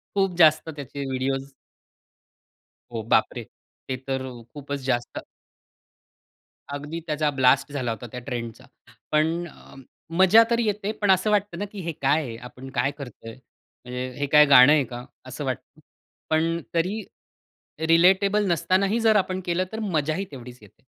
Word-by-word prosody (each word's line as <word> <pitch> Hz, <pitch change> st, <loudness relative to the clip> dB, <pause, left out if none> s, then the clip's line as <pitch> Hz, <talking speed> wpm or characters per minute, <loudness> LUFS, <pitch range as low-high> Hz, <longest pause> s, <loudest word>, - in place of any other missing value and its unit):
खूप 195 Hz, -3 st, +1 dB
जास्त 160 Hz, -1 st, +5 dB
त्याचे 140 Hz, -2 st, -7 dB
व्हिडिओज 135 Hz, +1 st, -2 dB, 1.4 s
हो, 110 Hz, -1 st, -3 dB
बापरे! -, -, +2 dB, 0.4 s
ते 130 Hz, -1 st, -3 dB
तर 130 Hz, 0 st, -2 dB
अ, 125 Hz, -2 st, -9 dB
खूपच 140 Hz, -1 st, -5 dB
जास्त 120 Hz, -1 st, -1 dB, 1.5 s
अगदी, 145 Hz, +4 st, -5 dB
त्याचा 150 Hz, 0 st, 0 dB
ब्लास्ट 135 Hz, +1 st, +3 dB
झाला 125 Hz, -4 st, -2 dB
होता 115 Hz, +2 st, -6 dB
त्या 125 Hz, -, -6 dB
ट्रेंडचा, 120 Hz, 0 st, -6 dB, 0.5 s
पण 160 Hz, +3 st, +1 dB
अ, -, -, -16 dB, 0.4 s
मजा 190 Hz, +5 st, +7 dB
तर 235 Hz, 0 st, +2 dB
येते. 210 Hz, -2 st, -1 dB
पण 200 Hz, -2 st, +4 dB
असं 190 Hz, +3 st, +2 dB
वाटतं 205 Hz, -4 st, 0 dB
ना 205 Hz, -, -2 dB
की, 205 Hz, -, -8 dB
हे 170 Hz, 0 st, -3 dB
काय 145 Hz, +4 st, +3 dB
आहे? 115 Hz, -3 st, -7 dB
आपण 125 Hz, +2 st, -11 dB
काय 140 Hz, -, +1 dB
करतोय? 120 Hz, -4 st, -9 dB
म्हणजे 125 Hz, 0 st, -9 dB
हे 145 Hz, -, 0 dB
काय 150 Hz, +1 st, +7 dB
गाणं 140 Hz, 0 st, +8 dB
आहे 145 Hz, -3 st, +3 dB
का? 120 Hz, +1 st, -8 dB, 0.2 s
असं -, -, -6 dB
वाटतं. -, -, -6 dB, 0.5 s
पण 165 Hz, +2 st, +1 dB
तरी 190 Hz, +6 st, -1 dB, 0.8 s
रिलेटेबल 195 Hz, +5 st, +4 dB
नसतानाही, 190 Hz, +6 st, +1 dB
जर 220 Hz, -1 st, +4 dB
आपण 185 Hz, -2 st, +1 dB
केलं, 175 Hz, +1 st, 0 dB
तर 220 Hz, -, -4 dB
मजाही 170 Hz, -2 st, -1 dB
तेवढीच 125 Hz, -2 st, -10 dB
येते. 105 Hz, 0 st, -19 dB
150 Hz, 150 wpm, -24 LUFS, 130-185 Hz, 1.5 s, गाणं